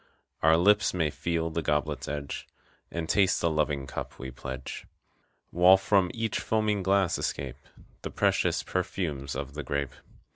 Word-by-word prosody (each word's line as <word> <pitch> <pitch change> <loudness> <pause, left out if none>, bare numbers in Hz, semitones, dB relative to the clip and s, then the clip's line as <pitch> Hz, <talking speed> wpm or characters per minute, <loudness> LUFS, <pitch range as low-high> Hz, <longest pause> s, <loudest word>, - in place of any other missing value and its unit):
Our 80 +1 +5
lips 100 +2 +4
may 80 -4 +1
feel 80 0 -2
the 85 +1 -1
goblet's 75 -2 -1
edge 70 -1 -5 0.4
And 85 -1 -4
taste 95 +1 +3
the 85 - +1
loving 75 -3 0
cup 65 - -6
we 65 0 -7
pledge. 65 0 -7 0.6
While 90 +2 +7
from 95 -1 +2
each 115 -3 -2
foaming 110 -2 0
glass 95 -1 +2
escape - - -3 0.4
The - - -5
precious - - +1
perfumes 75 -8 -3
of 70 0 -5
the 75 - -4
grape. 70 0 -2
80 Hz, 150 wpm, -28 LUFS, 70-95 Hz, 0.6 s, While